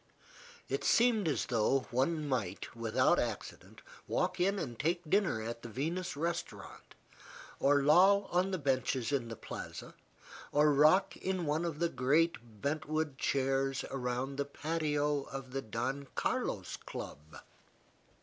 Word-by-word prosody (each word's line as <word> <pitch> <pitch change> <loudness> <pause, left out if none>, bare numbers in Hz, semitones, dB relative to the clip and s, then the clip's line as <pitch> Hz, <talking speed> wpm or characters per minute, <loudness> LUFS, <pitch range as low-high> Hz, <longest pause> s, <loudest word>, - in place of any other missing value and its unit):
It - - -2
seemed 230 -5 +4
as 150 - 0
though 125 +3 +2
one 150 +5 0
might, 120 -9 -3
without 115 -1 +2
accident, - - -5 0.2
walk - - 0
in 195 +3 +2
and 120 - -5
take 170 +2 0
dinner 170 - +2
at 115 +1 -5
the 120 - -8
Venus 160 - -3
Restaurant, 160 - -5 0.6
or 145 0 +4
loll 190 +7 +6
on 180 +2 +2
the 190 - -1
benches 130 -3 0
in 130 -5 0
the 115 - -6
Plaza, - - -8 0.6
or 150 0 +4
rock 155 +7 +5
in 185 -2 -2
one 155 +3 0
of 165 -3 -3
the 170 +2 +2
great 165 +4 +2 0.3
bent 150 +2 -1
wood 155 -3 -1
chairs 135 0 0
around 130 +1 -2
the 140 - 0
patio 150 -1 -1
of 135 -2 -7
the 135 +1 -2
Don 125 +5 -3
Carlos - - -2
Club. 75 +2 -9
145 Hz, 140 wpm, -33 LUFS, 130-165 Hz, 0.6 s, loll